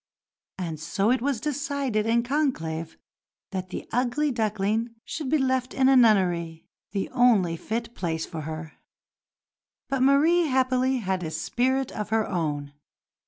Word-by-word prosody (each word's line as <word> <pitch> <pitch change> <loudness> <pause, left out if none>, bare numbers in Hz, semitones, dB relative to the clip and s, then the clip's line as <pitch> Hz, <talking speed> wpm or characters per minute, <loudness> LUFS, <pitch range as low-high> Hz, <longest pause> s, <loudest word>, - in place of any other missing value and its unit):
And 165 -4 -4
so 195 +8 0
it 255 - +2
was 275 -2 0
decided 275 -5 -1
in 235 +1 +3
conclave 170 - -2 0.5
that 185 -1 -4
the - - -6
"ugly 260 +4 +1
duckling" 220 0 -1
should 300 -5 -4
be 310 - +3
left 260 -2 0
in 260 -1 +4
a 270 - +6
nunnery 175 -9 +3 0.3
the 195 -1 -2
only 230 -9 +4
fit 230 +6 -4
place 165 -6 -2
for 165 -3 -6
her. 155 +1 -6 1.2
But 270 -1 0
Marie 310 +6 +4
happily 260 -1 +2
had 190 -5 -1
a 160 - -3
spirit 255 +11 0
of 210 -1 -5
her 220 0 +1
own. 150 -5 -2
230 Hz, 145 wpm, -26 LUFS, 180-260 Hz, 1.2 s, a